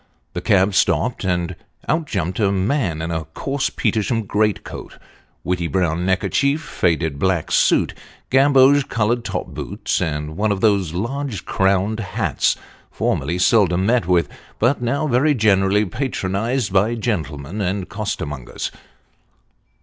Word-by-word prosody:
The - - -3
cab 95 0 +3
stopped, 120 +4 +1
and 90 -1 -1 0.3
out 155 +1 0
jumped 95 -3 -2
a 100 -3 +3
man 95 - 0
in 85 - -3
a 80 -1 -2
coarse 135 - -2
Petersham 115 +1 0
great 105 +1 0
coat, - - -9 0.5
whity 90 -2 -1
brown 85 +2 0
neckerchief, 140 - +1
faded 80 - -1
black 95 -3 0
suit, - - +3 0.4
gamboge 135 +1 +5
coloured 115 +2 0
top - - -4
boots, - - -3
and 75 0 -3
one 105 +1 +1
of 100 - -1
those 100 -7 +2
large 120 -1 -3
crowned 95 +3 +1
hats, 100 -4 0 0.3
formerly 75 +6 -1
seldom 90 -1 +3
met 115 -3 +2
with, 85 -4 +3 0.3
but 120 +3 +2
now 140 +5 0
very 145 +2 +2
generally 105 -2 +3
patronised 110 0 -2
by 105 +5 +3
gentlemen 95 - -3
and 95 0 -2
costermongers. 80 - -4
100 Hz, 135 wpm, -20 LUFS, 90-120 Hz, 0.5 s, gamboge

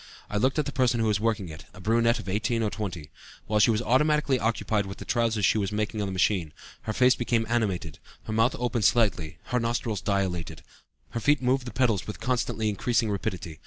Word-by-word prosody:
I 105 - -1
looked 130 +7 +1
at 150 - +1
the 140 - -3
person 125 -3 +1
who 115 - +1
was 105 -2 +1
working 110 -5 -1
it, 80 +1 -10
a - - -12
brunette 115 +4 +2
of - - -8
18 110 +4 0
or 105 - 0
20. 90 -6 -5 0.3
While 105 0 +1
she 105 - +5
was 115 +1 +1
automatically 140 +2 +2
occupied 110 -2 0
with 95 - -7
the - - -9
trousers 115 -4 +1
she 110 - +3
was 100 -1 -1
making 105 0 -2
on 100 - -1
the - - -3
machine, 90 -4 0 0.3
her 110 - -3
face 125 +2 +5
became 120 -2 0
animated, 100 - -1 0.2
her 110 - -5
mouth 115 +3 +2
opened 120 -3 -1
slightly, 100 -10 +2
her 125 - -1
nostrils 115 -4 -2
dilated, 90 -5 -2 0.5
her 115 - -3
feet 145 +4 +3
moved 130 +1 +1
the - - -5
pedals 120 -8 +1
with 105 - -6
constantly 120 -3 -1
increasing 110 +2 0
rapidity. 90 -5 -4
110 Hz, 215 wpm, -27 LUFS, 100-120 Hz, 0.5 s, she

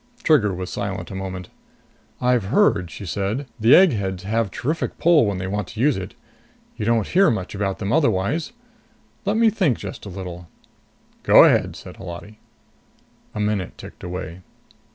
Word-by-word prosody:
Trigger 135 -11 +4
was 90 0 -5
silent 100 0 -4
a - - -6
moment. 95 -1 -6 0.7
"I've 125 -4 +2
heard," 105 - +2
she 100 - -9
said, 100 - -2
"the 115 +4 +6
eggheads 100 - +3
have 110 +1 0
terrific 155 +11 -3
pull 160 -8 +4
when 100 -2 -2
they 90 - -4
want 100 0 -3
to 110 - -10
use 140 +2 +3
it. 95 - -6 0.6
You 105 - -4
don't 115 -2 +2
hear 190 0 +4
much 95 -7 -3
about 100 -1 -2
them 100 +1 -2
otherwise. 145 - +1 0.7
Let 205 +2 +1
me 225 -1 +4
think 185 - +1
just 100 +1 -8
a - - -6
little." 90 -2 -8 0.7
"Go - - +7
ahead," - - +3
said - - -11
Holati. 85 +5 -9 1.0
A - - -3
minute 105 -3 -2
ticked - - -12
away. 90 -1 -6
105 Hz, 165 wpm, -22 LUFS, 95-125 Hz, 1.0 s, Go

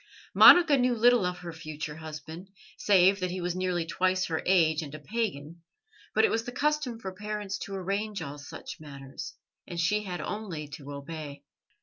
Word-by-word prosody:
Monica 330 -6 +8
knew 250 -1 +2
little 235 -3 +4
of 180 0 -3
her 175 -2 -8
future 155 -1 -6
husband, 160 +3 -9 0.3
save 195 0 +4
that 185 0 -1
he 185 +1 -4
was 175 0 -2
nearly 180 -2 -1
twice 185 +2 +1
her 160 -3 -2
age 165 -4 +4
and 150 -1 -7
a - - -8
pagan, 170 -4 -4 0.5
but - - +5
it - - +1
was 225 - 0
the 245 - -6
custom 285 -3 -1
for 190 -4 -6
parents 210 0 -4
to 195 - -6
arrange 200 +2 -2
all 145 -3 -6
such 145 +4 -9
matters, 140 +1 -9 0.3
and 175 -1 -5
she 210 +5 +2
had 185 -4 -5
only 185 -8 -5
to 145 0 -9
obey. 145 0 -7
180 Hz, 185 wpm, -28 LUFS, 155-210 Hz, 0.5 s, Monica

